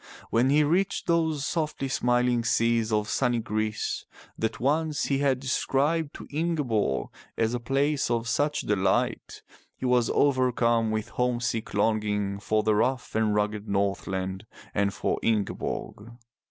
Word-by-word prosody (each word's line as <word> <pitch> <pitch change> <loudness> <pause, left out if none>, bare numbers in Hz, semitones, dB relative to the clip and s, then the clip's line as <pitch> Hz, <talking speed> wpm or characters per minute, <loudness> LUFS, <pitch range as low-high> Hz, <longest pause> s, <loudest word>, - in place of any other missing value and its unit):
When 120 +3 +3
he 150 +2 +4
reached 175 +6 +1
those 160 -4 +1
softly 155 -4 -2
smiling 125 -2 +1
seas 115 -1 +2
of 105 -1 +1
sunny 120 +1 +1
Greece, 110 -1 -2 0.3
that 110 - -2
once 150 +3 +1
he 135 -1 0
had 135 -2 +2
described 140 +4 0
to - - -9
Ingeborg 140 - 0 0.3
as 115 +1 +1
a 120 - -1
place 135 +3 0
of 115 -1 0
such 145 +6 +1
delight, 100 -2 0 0.3
he - - -5
was 125 -2 +3
overcome 120 -4 +2
with 110 -1 -2
homesick 120 -3 -1
longing 105 -2 0
for 110 +1 0
the 110 - +3
rough 125 +4 0
and 110 -1 +1
rugged 105 0 -1
Northland 95 0 -2 0.3
and 100 -1 +1
for - - -2
Ingeborg. 110 0 -2
120 Hz, 140 wpm, -27 LUFS, 110-135 Hz, 0.3 s, he